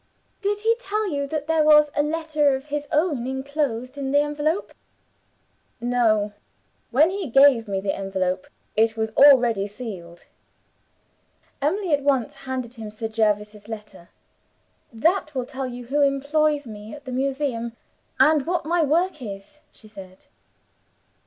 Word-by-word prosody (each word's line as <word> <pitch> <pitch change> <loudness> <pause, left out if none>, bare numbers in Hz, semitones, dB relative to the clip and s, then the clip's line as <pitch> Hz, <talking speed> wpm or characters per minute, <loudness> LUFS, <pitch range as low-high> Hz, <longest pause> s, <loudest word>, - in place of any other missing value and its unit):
'" - - -43
"Did 410 0 -1
he 450 +1 +3
tell 425 -3 -2
you 280 -1 -2
that 295 0 -3
there 320 0 +2
was 300 -1 +6
a - - +3
letter 300 -2 +1
of 265 +1 -7
his 295 0 -3
own 295 -6 +1
inclosed 265 -1 -3
in 270 -1 -3
the 285 - +3
envelope?" 295 +5 -1 1.1
"No. 225 -4 +1 0.6
When 300 +8 +4
he 385 -6 -4
gave 270 -3 +5
me 195 -1 -2
the 195 0 -1
envelope 190 -1 -2 0.3
it 225 +1 +2
was 220 0 -1
already 240 -6 +5
sealed." 195 -6 -9 1.4
Emily 345 +4 0
at 285 - +2
once 270 -5 +1
handed 260 -3 -5
to 235 -2 -13
him 215 - -6
Sir 220 +1 -5
Jervis's 210 -1 -1
letter. 210 -5 -9 0.8
"That 305 - 0
will 255 -2 -1
tell 265 +1 -5
you 245 -1 -8
who 285 +5 0
employs 285 +1 +1
me 215 0 -9
at 290 -1 -14
the 260 - -6
Museum, 260 -3 -2 0.5
and 300 +2 +4
what 350 -2 -1
my 340 +2 +1
work 320 +1 +1
is," 205 +6 -9
she 215 - -18
said. 190 -3 -13
265 Hz, 150 wpm, -23 LUFS, 220-300 Hz, 1.4 s, was